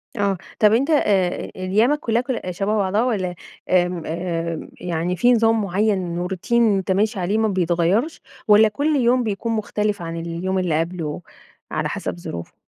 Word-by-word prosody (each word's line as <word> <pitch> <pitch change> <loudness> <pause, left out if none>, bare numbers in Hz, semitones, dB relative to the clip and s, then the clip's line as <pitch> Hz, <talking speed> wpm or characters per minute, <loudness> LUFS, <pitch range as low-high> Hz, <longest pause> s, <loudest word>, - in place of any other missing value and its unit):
آه 200 -3 0 0.2
طب 215 0 +5
أنت 270 +7 +2
آآ، 195 - +1
أيامك 215 +10 +1
كُلّها 235 -3 0
كُلّ 255 -2 -3
شبه 200 +4 -1
بعضها؟ 200 +3 +1
والّا 185 -8 -1 0.3
آمم 180 -2 +2
آآ، 165 -1 -3
يعني 175 +1 -2
في 245 +5 +4
نظام 225 -1 +3
معيّن 190 -3 0
و 180 - -2
routine 190 +5 -5
أنت 205 -5 +3
ماشي 205 +2 +1
عليه 190 +4 0
ما 220 - +2
بيتغيرش؟ 185 - 0 0.3
والّا 215 +1 +7
كل 290 +8 0
يوم 250 -1 +3
بيكون 220 +2 -2
مختلف 210 -2 -1
عن 165 0 -5
اليوم 170 +3 -2
اللي 165 -4 0
قَبلُه 165 -2 -3 0.5
على - - -1
حسب 85 -1 -4
ظروفه؟ 85 0 -7
195 Hz, 165 wpm, -21 LUFS, 175-220 Hz, 0.5 s, والّا